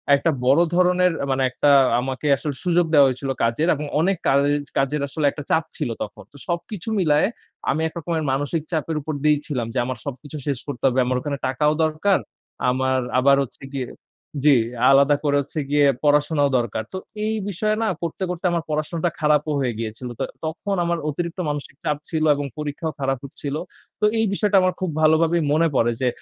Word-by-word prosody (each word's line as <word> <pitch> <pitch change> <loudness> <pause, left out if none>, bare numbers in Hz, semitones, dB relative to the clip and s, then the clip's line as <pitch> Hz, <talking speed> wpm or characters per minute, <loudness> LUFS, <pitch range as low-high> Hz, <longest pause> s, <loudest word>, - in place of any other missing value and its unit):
একটা 160 +4 +1
বড় 135 +6 +5
ধরনের 180 0 +4
আ - - 0
মানে, 135 0 +1
একটা 145 - +2 0.3
আমাকে 130 +3 -3
আসলে 145 0 -4
সুযোগ 175 -1 +3
দেয়া 145 -2 +7
হয়েছিল 130 +1 -3
কাজের 115 +8 +1
এবং 150 +1 -5
অনেক 185 +4 +2
কাজ 135 - +4 0.4
কাজের 135 +2 +1
আসলে 145 +2 -2
একটা 145 - -7
চাপ 160 - +3
ছিল 150 -6 -2
তখন। 105 - -9
তো 145 - -15
সবকিছু 175 +3 -4
মিলায়ে, 150 -4 +3 0.4
আমি 160 - +1
এক 160 - -9
রকমের 165 -1 -2
মানসিক 145 +4 -1
চাপের 160 -1 -1
উপর 155 +2 -4
দিয়েই 150 -1 +4
ছিলাম 125 -6 -2
যে, - - -4
আমার 130 -1 -4
সবকিছু 145 +2 -7
শেষ 140 -4 -1
করতে 140 -3 -6
হবে। 130 0 +1
আমার 125 0 0
ওখানে 140 +1 -3
টাকাও 150 +3 +2
দরকার। 160 +6 +1 0.5
আমার 130 +1 +1 0.2
আবার 140 +2 +5
হচ্ছে 135 - -12
গিয়ে 130 -3 -3 0.6
জি, 145 -2 +6 0.4
আলাদা 140 +1 +5
করে 145 -1 +2
হচ্ছে 145 +3 -6
গিয়ে 145 0 +4 0.2
পড়াশোনাও 145 0 +3
দরকার। 115 -2 -2
তো - - -3 0.3
এই 220 - 0 0.2
বিষয়ে 215 +3 0
না? - - +1
করতে, 170 +2 -3
করতে 180 0 -4
আমার 170 -1 -1
পড়াশোনাটা 155 +3 -1
খারাপও 150 0 +2
হয়ে 125 -3 0
গিয়েছিল। 115 +2 -5
তো - - 0 0.2
তখন 180 +5 -3
আমার 170 0 0
অতিরিক্ত 170 +4 -4
মানসিক 145 -2 -5
চাপ 150 - 0
ছিল 160 -1 -1
এবং 145 0 -3
পরীক্ষাও 150 +2 -3
খারাপ 135 -1 0
হচ্ছিল। 140 +1 -5 0.4
তো 210 - +2
এই 225 - +3
বিষয়টা 205 0 +2
আমার 185 0 +2
খুব 185 - -1
ভালোভাবেই 160 +2 +3
মনে 165 +2 +3
পড়ে 120 -1 +3
যে 130 - +2
150 Hz, 190 wpm, -22 LUFS, 135-165 Hz, 0.6 s, দেয়া